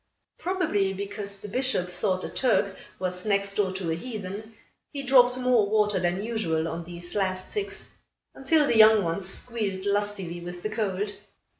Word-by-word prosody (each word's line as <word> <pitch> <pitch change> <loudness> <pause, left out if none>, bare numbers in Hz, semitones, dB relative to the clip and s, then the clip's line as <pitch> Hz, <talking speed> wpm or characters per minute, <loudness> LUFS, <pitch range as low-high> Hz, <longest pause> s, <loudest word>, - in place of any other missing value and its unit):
Probably, 305 - 0
because 200 +1 -5
the 205 - -8
Bishop 210 -5 0
thought 185 +1 -1
a - - -4
Turk 210 -6 +1 0.2
was 180 0 -3
next 200 -1 +1
door 200 -2 +1
to 185 -3 -2
a - - 0
heathen, 215 +1 -7 0.4
he 280 -2 -5
dropped 250 -2 +5
more 250 -5 +3
water 210 -2 +2
than 180 +2 0
usual 170 -9 -1
on 170 +1 -4
these 175 0 -8
last 185 -2 -1
six, 415 -1 -4 0.5
until 295 +3 +3
the 235 - +2
young 215 -1 +8
ones 185 +3 -1
squealed 200 -4 -2
lustily 200 -4 -1
with 175 0 -8
the 215 - -2
cold. 205 -2 -1
200 Hz, 165 wpm, -27 LUFS, 185-220 Hz, 0.5 s, young